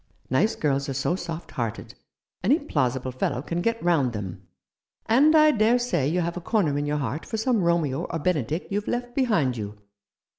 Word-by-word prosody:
Nice 205 Hz, +12 st, +2 dB
girls 140 Hz, -2 st, 0 dB
are 135 Hz, -, -3 dB
so 140 Hz, +6 st, 0 dB
soft 170 Hz, -2 st, -6 dB
hearted; 115 Hz, -4 st, -4 dB, 0.5 s
any 255 Hz, +11 st, +4 dB
plausible 130 Hz, -, -1 dB
fellow 125 Hz, 0 st, -2 dB
can 170 Hz, +3 st, -2 dB
get 230 Hz, +3 st, -1 dB
round 150 Hz, -8 st, +2 dB
them. 95 Hz, -3 st, -6 dB, 0.6 s
And 285 Hz, +8 st, +5 dB
I 305 Hz, 0 st, +7 dB
dare 225 Hz, -1 st, +3 dB
say 180 Hz, -, 0 dB
you 175 Hz, +4 st, +1 dB
have 170 Hz, 0 st, -2 dB
a -, -, -5 dB
corner 170 Hz, -7 st, +1 dB
in 145 Hz, 0 st, -1 dB
your 150 Hz, 0 st, 0 dB
heart 145 Hz, +2 st, -3 dB
for 220 Hz, -, -4 dB
some 225 Hz, -1 st, +1 dB
Romeo 170 Hz, -6 st, +1 dB
or 165 Hz, -, -3 dB
Benedick 160 Hz, -1 st, -1 dB
you've 205 Hz, +1 st, -2 dB
left 245 Hz, 0 st, -2 dB
behind 205 Hz, -, +1 dB
you." 105 Hz, -1 st, -6 dB
165 Hz, 190 wpm, -25 LUFS, 135-220 Hz, 0.6 s, I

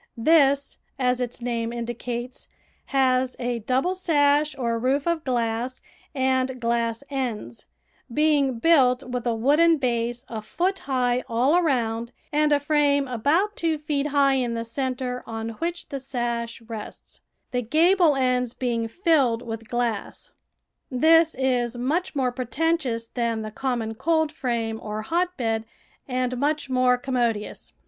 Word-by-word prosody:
This, 280 Hz, +1 st, +3 dB, 0.2 s
as 250 Hz, -1 st, +1 dB
its 245 Hz, 0 st, -4 dB
name 235 Hz, -1 st, -2 dB
indicates, 240 Hz, +1 st, -5 dB, 0.4 s
has 255 Hz, -1 st, +2 dB
a 240 Hz, -1 st, -2 dB
double 260 Hz, -, 0 dB
sash 300 Hz, -4 st, +2 dB
or 235 Hz, -3 st, -1 dB
roof 270 Hz, +4 st, +1 dB
of 335 Hz, -2 st, 0 dB
glass 240 Hz, -1 st, -1 dB, 0.4 s
and 260 Hz, -1 st, +1 dB
glass 235 Hz, 0 st, 0 dB
ends, 230 Hz, -, -4 dB, 0.4 s
being 285 Hz, -2 st, +2 dB
built 255 Hz, -2 st, +4 dB
with 250 Hz, -1 st, -4 dB
a 235 Hz, -, +1 dB
wooden 300 Hz, +8 st, +4 dB
base 240 Hz, -1 st, -1 dB
a 220 Hz, -2 st, -5 dB
foot 365 Hz, -, -1 dB
high 250 Hz, -1 st, +1 dB
all 250 Hz, +7 st, +3 dB
around 235 Hz, -8 st, 0 dB, 0.2 s
and 300 Hz, 0 st, +3 dB
a 290 Hz, -, +4 dB
frame 285 Hz, -1 st, +2 dB
about 305 Hz, -, +1 dB
two 325 Hz, -2 st, 0 dB
feet 295 Hz, -1 st, -1 dB
high 280 Hz, -1 st, +3 dB
in 245 Hz, -3 st, 0 dB
the 230 Hz, 0 st, -3 dB
centre 255 Hz, 0 st, -3 dB
on 225 Hz, 0 st, -4 dB
which 335 Hz, +10 st, -4 dB
the 280 Hz, -2 st, -4 dB
sash 240 Hz, -3 st, -3 dB
rests, 220 Hz, -2 st, -9 dB, 0.3 s
the 250 Hz, -1 st, 0 dB
gable 325 Hz, -, +4 dB
ends 250 Hz, -2 st, 0 dB
being 235 Hz, -3 st, -1 dB
filled 270 Hz, -, +2 dB
with 225 Hz, -1 st, -6 dB
glass. 240 Hz, -4 st, -3 dB, 0.6 s
This 320 Hz, +5 st, +4 dB
is 245 Hz, -2 st, 0 dB
much 300 Hz, +9 st, -1 dB
more 260 Hz, -3 st, +1 dB
preten 290 Hz, +7 st, 0 dB
tious 230 Hz, -6 st, -3 dB
than 230 Hz, -2 st, -1 dB
the 215 Hz, -, -6 dB
common 235 Hz, -2 st, -2 dB
coldframe 250 Hz, -7 st, -1 dB
or 215 Hz, 0 st, -4 dB
hotbed 260 Hz, -9 st, -1 dB, 0.4 s
and 255 Hz, -1 st, -1 dB
much 290 Hz, 0 st, -1 dB
more 255 Hz, -1 st, +3 dB
commodious. 240 Hz, -5 st, -2 dB
255 Hz, 140 wpm, -24 LUFS, 235-290 Hz, 0.6 s, built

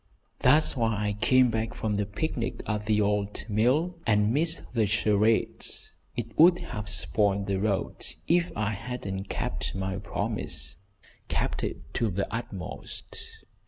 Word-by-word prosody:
"That's 150 Hz, +5 st, +5 dB
why 115 Hz, -3 st, +1 dB
I -, -, -1 dB
came 125 Hz, +4 st, +4 dB
back 110 Hz, 0 st, -2 dB
from 110 Hz, -1 st, -1 dB
the 105 Hz, -1 st, 0 dB
picnic 115 Hz, +2 st, -2 dB
at 105 Hz, -1 st, -2 dB
the 105 Hz, -1 st, +3 dB
old 105 Hz, 0 st, 0 dB
mill 135 Hz, -, +2 dB
and 105 Hz, 0 st, +3 dB
missed 160 Hz, +1 st, 0 dB
the 110 Hz, -4 st, +2 dB
charades. 110 Hz, +1 st, +1 dB, 0.3 s
It -, -, -4 dB
would 175 Hz, +2 st, +8 dB
have 105 Hz, -8 st, -6 dB
spoiled 100 Hz, +1 st, +1 dB
the 95 Hz, -1 st, 0 dB
road 100 Hz, -1 st, -1 dB, 0.2 s
if 175 Hz, +1 st, +3 dB
I 110 Hz, 0 st, 0 dB
hadn't 100 Hz, -3 st, -5 dB
kept -, -, -2 dB
my 95 Hz, 0 st, -2 dB
promise, -, -, -3 dB, 0.5 s
kept -, -, -1 dB
it 70 Hz, -, -5 dB
to 115 Hz, -, +1 dB
the 100 Hz, +1 st, -1 dB
utmost. 105 Hz, -6 st, -6 dB
110 Hz, 145 wpm, -28 LUFS, 100-120 Hz, 0.5 s, would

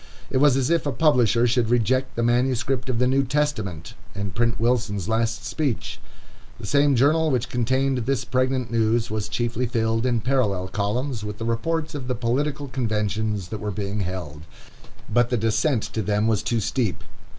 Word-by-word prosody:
It -, -, +1 dB
was 135 Hz, -1 st, +5 dB
as 135 Hz, +3 st, +1 dB
if 165 Hz, -3 st, +1 dB
a -, -, +1 dB
publisher 120 Hz, -4 st, +3 dB
should 120 Hz, -1 st, +1 dB
reject 130 Hz, +2 st, +1 dB
the 115 Hz, -, 0 dB
manuscript 125 Hz, +1 st, +1 dB
of 125 Hz, -, 0 dB
the 125 Hz, -, +2 dB
New 135 Hz, +2 st, +3 dB
Testament, 115 Hz, -, -2 dB, 0.2 s
and 100 Hz, -2 st, -4 dB
print 115 Hz, -1 st, 0 dB
Wilson's 115 Hz, -6 st, 0 dB
last 115 Hz, +1 st, 0 dB
speech. 145 Hz, -8 st, -2 dB, 0.6 s
The -, -, -7 dB
same 145 Hz, -1 st, +3 dB
journal 155 Hz, +6 st, +3 dB
which 125 Hz, -5 st, 0 dB
contained 130 Hz, +2 st, +1 dB
this 130 Hz, +2 st, -1 dB
pregnant 130 Hz, -1 st, 0 dB
news, 115 Hz, 0 st, +1 dB
was 110 Hz, -1 st, -2 dB
chiefly 120 Hz, +1 st, -1 dB
filled, 115 Hz, +1 st, 0 dB
in 120 Hz, -3 st, +1 dB
parallel 105 Hz, -8 st, 0 dB
columns, 110 Hz, +5 st, -2 dB
with 105 Hz, 0 st, -5 dB
the 115 Hz, -, -4 dB
reports 155 Hz, +7 st, -1 dB
of 135 Hz, -4 st, -5 dB
the 125 Hz, -, -1 dB
political 140 Hz, +5 st, -1 dB
conventions 110 Hz, -5 st, -2 dB
that 110 Hz, -, -5 dB
were 105 Hz, -, -3 dB
being 100 Hz, +1 st, -3 dB
held. 90 Hz, -6 st, -5 dB, 0.7 s
But 120 Hz, 0 st, +2 dB
the 125 Hz, -, +1 dB
descent 115 Hz, +3 st, +1 dB
to 110 Hz, -, -1 dB
them 105 Hz, +1 st, 0 dB
was 110 Hz, -3 st, +2 dB
too 115 Hz, -2 st, 0 dB
steep. 110 Hz, -2 st, -1 dB
120 Hz, 180 wpm, -24 LUFS, 110-130 Hz, 0.7 s, was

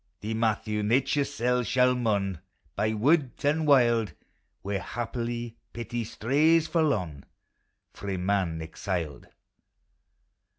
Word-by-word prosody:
Thee, 110 Hz, +2 st, -3 dB
Matthew, 110 Hz, -1 st, 0 dB
Xature's 135 Hz, +6 st, +1 dB
seF 125 Hz, +1 st, 0 dB
shall 125 Hz, 0 st, +4 dB
mourn 100 Hz, -7 st, 0 dB, 0.4 s
By 110 Hz, +2 st, 0 dB
wood 135 Hz, +3 st, +2 dB
and 150 Hz, +2 st, +1 dB
wild, 120 Hz, -, +4 dB, 0.5 s
Where, 100 Hz, 0 st, -2 dB
haply, 120 Hz, 0 st, -4 dB, 0.2 s
pity 120 Hz, 0 st, -4 dB
strays 155 Hz, +10 st, +2 dB
forlorn, 105 Hz, -, 0 dB, 0.7 s
Frae 100 Hz, -2 st, -4 dB
man 90 Hz, -3 st, 0 dB
exiled. 80 Hz, -1 st, -4 dB
115 Hz, 100 wpm, -27 LUFS, 100-125 Hz, 0.7 s, shall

